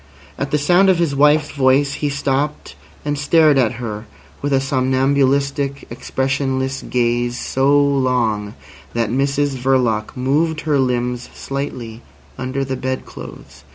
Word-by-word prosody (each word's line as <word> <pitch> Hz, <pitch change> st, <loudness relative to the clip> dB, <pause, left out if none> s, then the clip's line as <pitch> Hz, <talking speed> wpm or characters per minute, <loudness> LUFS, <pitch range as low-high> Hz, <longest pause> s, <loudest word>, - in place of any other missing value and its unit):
At 140 Hz, -, -3 dB
the 150 Hz, -, +1 dB
sound 175 Hz, +6 st, +4 dB
of 185 Hz, -, +4 dB
his 165 Hz, -5 st, 0 dB
wife's 150 Hz, +2 st, +3 dB
voice 140 Hz, 0 st, +2 dB
he 145 Hz, -, -2 dB
stopped 140 Hz, +1 st, -2 dB, 0.3 s
and 145 Hz, -1 st, -1 dB
stared 150 Hz, -1 st, +4 dB
at 120 Hz, -2 st, +2 dB
her 115 Hz, -2 st, -6 dB, 0.3 s
with 145 Hz, -, -2 dB
a 135 Hz, -, +3 dB
somnambulistic, 140 Hz, +1 st, +1 dB
expressionless 135 Hz, 0 st, -2 dB
gaze 120 Hz, 0 st, 0 dB
so 140 Hz, +2 st, +2 dB
long 125 Hz, -7 st, +1 dB, 0.4 s
that 115 Hz, -2 st, 0 dB
Mrs 140 Hz, +1 st, 0 dB
Verloc 125 Hz, -4 st, 0 dB
moved 155 Hz, +5 st, 0 dB
her 150 Hz, -3 st, +1 dB
limbs 125 Hz, -1 st, -1 dB
slightly 125 Hz, -5 st, -5 dB, 0.3 s
under 130 Hz, +1 st, -3 dB
the 135 Hz, 0 st, -3 dB
bed 130 Hz, 0 st, -3 dB
clothes. -, -, -11 dB
135 Hz, 135 wpm, -19 LUFS, 125-140 Hz, 0.4 s, sound